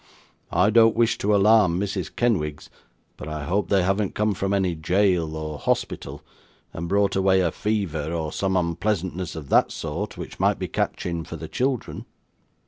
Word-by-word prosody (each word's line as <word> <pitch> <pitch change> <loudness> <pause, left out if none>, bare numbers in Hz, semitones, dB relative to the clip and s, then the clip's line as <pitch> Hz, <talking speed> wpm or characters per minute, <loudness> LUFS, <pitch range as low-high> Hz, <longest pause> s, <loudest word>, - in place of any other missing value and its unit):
I 100 +4 +3
don't 115 0 +5
wish 115 0 +2
to 105 +1 +2
alarm 100 -3 +4
Mrs. 95 -3 -3
Kenwigs; 75 -11 -1 0.5
but 75 - -8
I 75 -1 -4
hope 95 +1 0
they 100 -2 +3
haven't 95 +2 0
come 105 0 +1
from 100 0 -2
any 95 -3 +1
jail 85 -1 +1
or 75 -1 -5
hospital, - - -2 0.5
and 85 +1 -5
brought 100 0 +2
away 95 0 +3
a 85 -3 +1
fever 90 -8 -2
or 80 -3 -2
some 95 -1 0
unpleasantness 90 0 -2
of 75 -4 -8
that - - +4
sort, 85 +7 -5
which - - -8
might - - +2
be - - -3
catching 85 -1 -2
for - - -8
the - - -7
children. 130 -2 -2
95 Hz, 170 wpm, -24 LUFS, 80-105 Hz, 0.5 s, don't